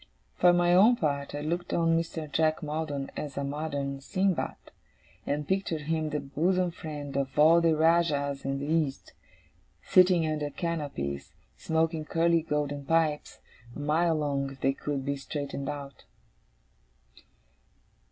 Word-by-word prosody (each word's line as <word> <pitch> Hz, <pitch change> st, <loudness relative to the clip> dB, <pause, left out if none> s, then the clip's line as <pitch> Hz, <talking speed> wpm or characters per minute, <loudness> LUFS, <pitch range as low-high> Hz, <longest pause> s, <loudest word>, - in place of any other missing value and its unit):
For 180 Hz, -, +5 dB
my 175 Hz, 0 st, +3 dB
own 210 Hz, +7 st, +6 dB
part, 145 Hz, -7 st, -2 dB
I 145 Hz, -, -4 dB
looked 170 Hz, +4 st, -3 dB
on 165 Hz, -1 st, +3 dB
Mr. 165 Hz, -1 st, -2 dB
Jack 155 Hz, +2 st, +1 dB
Maldon 150 Hz, -2 st, -3 dB
as 145 Hz, -3 st, -6 dB
a 140 Hz, -, -1 dB
modern 140 Hz, -1 st, -3 dB
Sindbad, 185 Hz, +5 st, -1 dB, 0.7 s
and 145 Hz, 0 st, -2 dB
pictured 190 Hz, -5 st, -1 dB
him 155 Hz, +1 st, -1 dB
the 150 Hz, 0 st, -2 dB
bosom 175 Hz, +6 st, 0 dB
friend 150 Hz, -5 st, -7 dB
of 140 Hz, +1 st, -2 dB
all 160 Hz, +3 st, +6 dB
the 165 Hz, -1 st, +3 dB
Rajahs 155 Hz, -4 st, +2 dB
in 135 Hz, 0 st, -2 dB
the 140 Hz, -, -4 dB
East, 155 Hz, -3 st, -1 dB, 0.7 s
sitting 180 Hz, -2 st, +5 dB
under 150 Hz, -2 st, -2 dB
canopies, 145 Hz, -, -4 dB, 0.2 s
smoking 160 Hz, -1 st, -1 dB
curly 165 Hz, +1 st, +2 dB
golden 145 Hz, -2 st, -2 dB
pipes 155 Hz, 0 st, 0 dB, 0.3 s
a -, -, -7 dB
mile 160 Hz, +3 st, +2 dB
long, 140 Hz, -2 st, -1 dB
if 135 Hz, -1 st, -13 dB
they 135 Hz, -, +2 dB
could 140 Hz, -1 st, -4 dB
be 140 Hz, 0 st, -1 dB
straightened 140 Hz, 0 st, -5 dB
out. 140 Hz, -2 st, -7 dB
150 Hz, 140 wpm, -28 LUFS, 140-165 Hz, 0.7 s, own